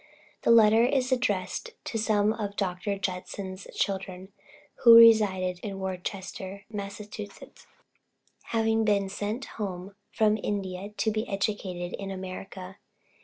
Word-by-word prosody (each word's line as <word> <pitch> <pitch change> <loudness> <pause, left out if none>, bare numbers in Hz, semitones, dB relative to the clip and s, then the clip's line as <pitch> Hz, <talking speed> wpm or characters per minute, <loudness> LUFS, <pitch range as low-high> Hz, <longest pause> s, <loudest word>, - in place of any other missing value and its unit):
The - - 0
letter 225 0 +7
is 260 0 +1
addressed 250 - -1
to 225 - -3
some 215 -1 +2
of 205 -3 -5
Dr. 195 +1 -2
Judson's 185 0 -5
children, 190 -1 -3 0.5
who 235 -2 +8
resided 205 -6 +6
in 195 0 -6
Worcester, 190 +1 -5
Massachusetts, 205 0 -8 0.8
having 225 -1 +1
been 200 -2 +1
sent 210 +6 -3 0.2
home 190 -1 -5 0.2
from 215 0 +2
India 195 -1 -3
to 210 +1 -1
be 215 +2 -3
educated 195 -3 -2
in 195 -1 -5
America. 190 0 -7
200 Hz, 120 wpm, -27 LUFS, 190-215 Hz, 0.8 s, who